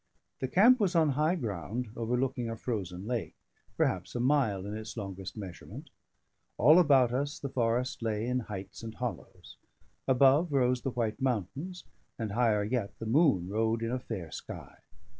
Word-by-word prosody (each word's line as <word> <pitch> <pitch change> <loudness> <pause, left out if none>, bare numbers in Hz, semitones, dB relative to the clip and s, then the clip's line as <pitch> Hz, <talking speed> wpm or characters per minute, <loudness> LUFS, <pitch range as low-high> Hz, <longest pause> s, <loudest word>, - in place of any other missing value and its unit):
The 130 - -1
camp 235 - +6
was 190 -4 +1
on 160 -2 +4
high 155 +5 +2
ground, 115 - -4
overlooking 125 +1 -1
a 115 - -3
frozen 100 -6 -4
lake, 120 -1 -3 0.4
perhaps 95 +4 0
a - - -1
mile 125 -7 +2
in 105 +1 -4
its 110 0 -7
longest 95 -1 -6
measurement; 95 -4 -9 0.7
all 155 +9 +7
about 135 -7 +5
us 140 +4 -1
the 140 - -5
forest 125 0 0
lay 110 -1 -1
in 125 +1 0
heights 100 -4 -7
and 115 -1 -7
hollows; 95 -7 -6 0.5
above 135 +5 +4
rose 125 -2 +2
the 135 - -2
white 115 -3 -2
mountains; 135 - -2 0.3
and 110 -4 -3
higher 110 -2 +2
yet, 110 -1 -2
the 115 - -6
moon 120 - +3
rode 110 +3 0
in 115 - -1
a 130 - -1
fair 95 -10 -6
sky. - - -9
120 Hz, 165 wpm, -30 LUFS, 105-135 Hz, 0.7 s, all